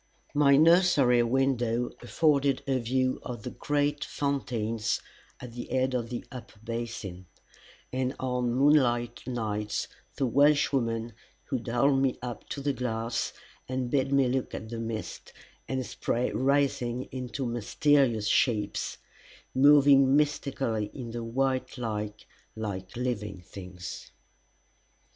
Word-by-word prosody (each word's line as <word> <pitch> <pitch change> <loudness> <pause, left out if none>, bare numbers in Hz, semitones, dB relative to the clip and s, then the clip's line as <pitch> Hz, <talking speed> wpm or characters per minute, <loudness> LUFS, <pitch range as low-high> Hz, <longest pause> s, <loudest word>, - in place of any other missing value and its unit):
My 140 -1 +5
nursery 155 -7 +5
window 120 -1 +1
afforded 140 0 +2
a 135 -2 +1
view 130 +2 0
of 120 -4 -7
the - - -5
great 145 0 0
fountains 115 -6 -1 0.4
at 125 -2 -9
the 120 0 -6
head 130 0 0
of 120 -2 -2
the 125 - -5
upper 125 -4 -10
basin, 115 -6 -5 0.7
and 130 +1 -1
on 125 -2 0
moonlight 120 -3 +3
nights 105 -4 -2 0.3
the 135 - 0
Welshwoman 125 -4 +2 0.4
would 125 -3 -2
hold 135 +4 +3
me 135 -2 +1
up 120 -3 -7
to 140 - -4
the 140 0 0
glass 115 -2 -2 0.4
and 130 -1 -2
bid 135 -1 +1
me 140 -2 +4
look 130 +1 -1
at 110 - -7
the 115 0 -5
mist 115 -1 -5 0.3
and 130 -1 -2
spray 120 +1 -1
rising 130 -2 +1
into 130 +1 -4
mysterious 120 0 +2
shapes, 105 -2 +1 0.6
moving 140 -1 +6
mystically 135 -7 0
in 120 -4 -6
the 120 0 -4
white 130 +3 -1
light 105 -3 -4 0.3
like 100 -4 -5
living 105 -6 -3
things. 90 0 -9
125 Hz, 125 wpm, -28 LUFS, 115-135 Hz, 0.7 s, moving